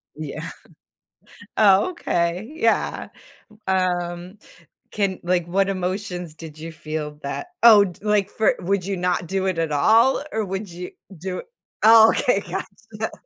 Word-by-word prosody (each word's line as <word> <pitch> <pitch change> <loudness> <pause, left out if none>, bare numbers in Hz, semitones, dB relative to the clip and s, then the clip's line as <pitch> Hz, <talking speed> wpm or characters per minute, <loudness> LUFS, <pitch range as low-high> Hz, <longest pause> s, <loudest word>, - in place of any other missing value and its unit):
Yeah. 155 +2 -6 1.1
Oh, 205 - +5
okay. 175 - -2
Yeah, 230 -7 0 0.4
u 215 - -20
um, 180 0 -1 0.5
can 195 -3 -1
like, 175 -1 +1
what 195 +2 +1
emotions 185 -2 -3
did 155 -1 -11
you 165 +1 -7
feel 155 -1 -6
that 140 - -4 0.2
Oh 210 -3 +8
d 180 - -9
like, 210 -2 +1
for 220 - +1
would 190 0 -1
you 195 -2 -2
not 180 -1 -1
do 190 +2 -1
it 185 -3 -1
at 165 -2 -1
all, 225 - +4
or 220 -1 -1
would 195 +1 -5
you 180 +1 -8 0.3
do 185 +2 -5 0.4
oh 220 0 +8
okay, 200 -5 +1
gotcha. 220 +3 -6
185 Hz, 145 wpm, -22 LUFS, 170-210 Hz, 1.1 s, Oh